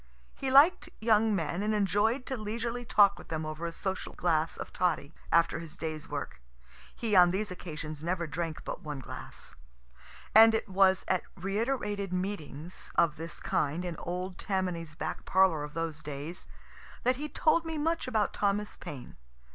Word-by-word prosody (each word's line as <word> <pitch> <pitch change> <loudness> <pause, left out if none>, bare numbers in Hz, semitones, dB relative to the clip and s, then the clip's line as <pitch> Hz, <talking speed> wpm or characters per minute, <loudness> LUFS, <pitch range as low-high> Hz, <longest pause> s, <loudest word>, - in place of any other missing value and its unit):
He 270 - -3
liked 285 +7 +6
young 220 -1 +3
men, 170 +1 -1
and 215 +1 +1
enjoy'd 210 +6 +2
to 265 - -3
leisurely 235 +2 -3
talk 200 -3 +5
with - - -12
them 160 -1 -3
over 155 +2 -4
a - - -4
social 190 +3 -4
glass 165 -2 +1
of - - -7
toddy, 165 -5 0 0.2
after 170 0 +3
his 165 -2 -9
day's 155 -2 -5
work, - - -5 0.5
(he 220 -3 0
on 180 -1 +8
these 200 +3 -1
occasions 155 -4 -6
never 175 0 -1
drank 160 +1 -4
but - - -5
one 150 -2 -5
glass,) 130 - -8 0.8
and 225 +1 +9
it 220 - -1
was 190 -1 +4
at 185 - +2
reiterated 205 0 -2
meetings 180 -3 -4
of 165 -3 +3
this 165 +2 -6
kind 155 +5 -1
in 175 -2 -3
old 180 +1 -4
Tammany's 180 -5 -2
back - - -4
parlor 185 -5 +4
of 150 0 -8
those 165 -2 -3
days, 150 +4 -6 0.6
that 255 +1 +2
he 300 +2 -4
told 325 +2 +3
me 325 -1 -4
much 325 0 0
about 220 -5 +1
Thomas 205 +1 0
Paine. 135 -4 -9
185 Hz, 170 wpm, -30 LUFS, 165-215 Hz, 0.8 s, and